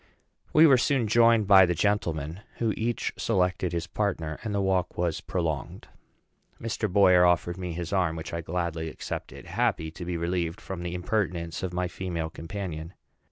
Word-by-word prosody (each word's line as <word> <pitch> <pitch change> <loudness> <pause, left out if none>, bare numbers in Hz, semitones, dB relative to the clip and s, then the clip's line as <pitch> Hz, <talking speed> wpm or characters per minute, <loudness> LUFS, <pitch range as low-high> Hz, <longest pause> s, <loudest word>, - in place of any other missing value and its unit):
We 155 +1 +7
were 135 -5 +6
soon 125 -3 +1
joined 115 0 +5
by 95 -2 +7
the 90 - 0
gentlemen, 85 -4 -1 0.2
who 115 -2 +1
each 115 +1 -2
selected 90 -4 0
his 85 -1 -2
partner, 90 -7 -2
and 110 - -3
the 100 - 0
walk 95 -2 0
was 85 -2 -1
prolonged. 80 -5 -3 0.7
Mr. 110 -2 -2
Boyer 90 -2 +6
offered 90 0 +2
me 90 -2 -4
his 85 +2 -4
arm, 90 -4 +1
which 80 0 -7
I 85 - -2
gladly 85 -1 -3
accepted, - - -7
happy 80 -1 0
to 85 - -8
be 85 0 -3
relieved 85 0 -2
from 95 -2 -6
the 90 0 -4
impertinence 90 -3 -2
of 95 - -3
my 90 0 -1
female 85 -3 -4
companion. 85 -1 -6
90 Hz, 170 wpm, -27 LUFS, 85-100 Hz, 0.7 s, We